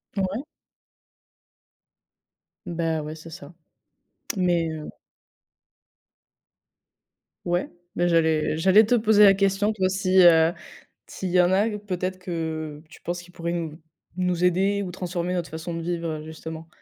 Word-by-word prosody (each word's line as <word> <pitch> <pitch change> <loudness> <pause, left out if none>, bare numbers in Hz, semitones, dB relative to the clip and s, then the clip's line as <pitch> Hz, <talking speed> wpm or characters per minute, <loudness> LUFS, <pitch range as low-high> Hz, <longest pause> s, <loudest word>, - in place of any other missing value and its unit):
Mouais. 200 +7 -2 2.2
Bah, 165 -2 -1
ouais, 150 +1 -6
c'est 160 +1 -11
ça. 150 0 -11 0.8
Mais 175 -3 +1
heu 155 -1 -6 2.6
Ouais. 175 +1 0 0.3
Mais 175 0 +1
j'allais 160 -2 +2
j'allais 190 +5 +6
te 245 - +3
poser 215 -2 +5
la 195 -1 +8
question. 200 +2 +1
Toi, 190 -3 0
si, 190 0 +2
heu, 165 -1 +6 0.6
s'il 185 - -5
y 180 +1 +4
en 180 0 +4
a, 205 +4 +3
peut-être 185 -2 -4
que 160 -4 -4
tu - - -15
penses 175 +1 -4
qu'ils 180 0 -17
pourraient 170 0 -4
nous 165 -2 -5 0.4
nous 180 -1 0
aider 195 +3 +2
ou 185 - -5
transformer 180 0 -3
notre 175 -2 -3
façon 160 +2 -5
de 165 - -4
vivre, 170 -1 -2
heu, - - -10
justement? 160 +1 -8
175 Hz, 140 wpm, -25 LUFS, 165-190 Hz, 2.6 s, la